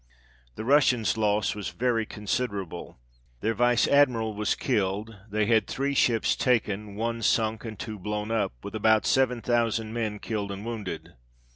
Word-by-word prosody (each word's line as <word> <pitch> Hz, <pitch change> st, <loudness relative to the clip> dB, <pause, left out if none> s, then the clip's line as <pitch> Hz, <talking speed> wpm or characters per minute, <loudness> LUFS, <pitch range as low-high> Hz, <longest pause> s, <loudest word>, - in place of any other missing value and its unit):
The 110 Hz, -, -6 dB
Russians' 125 Hz, -5 st, +3 dB
loss 105 Hz, -1 st, +1 dB
was 105 Hz, -1 st, -5 dB
very 115 Hz, -3 st, 0 dB
considerable, 100 Hz, -, -4 dB, 0.4 s
their 110 Hz, +2 st, +1 dB
Vice 120 Hz, +1 st, +3 dB
Admiral 125 Hz, -6 st, +3 dB
was 105 Hz, 0 st, 0 dB
killed, 105 Hz, +3 st, -1 dB
they 105 Hz, +1 st, +1 dB
had 110 Hz, -1 st, +3 dB
three 140 Hz, +1 st, -1 dB
ships 120 Hz, -4 st, +2 dB
taken, 105 Hz, -4 st, 0 dB
one 115 Hz, +2 st, -2 dB
sunk, 110 Hz, 0 st, +1 dB
and 110 Hz, -2 st, -6 dB
two 110 Hz, -3 st, -6 dB
blown 105 Hz, +2 st, -3 dB
up; 110 Hz, -, 0 dB
with 100 Hz, -, -7 dB
about 110 Hz, 0 st, +3 dB
7000 120 Hz, -3 st, +1 dB
men 110 Hz, -3 st, -2 dB
killed 105 Hz, -1 st, -3 dB
and 100 Hz, +2 st, -6 dB
wounded. 110 Hz, -5 st, -5 dB
110 Hz, 150 wpm, -27 LUFS, 105-120 Hz, 0.4 s, Russians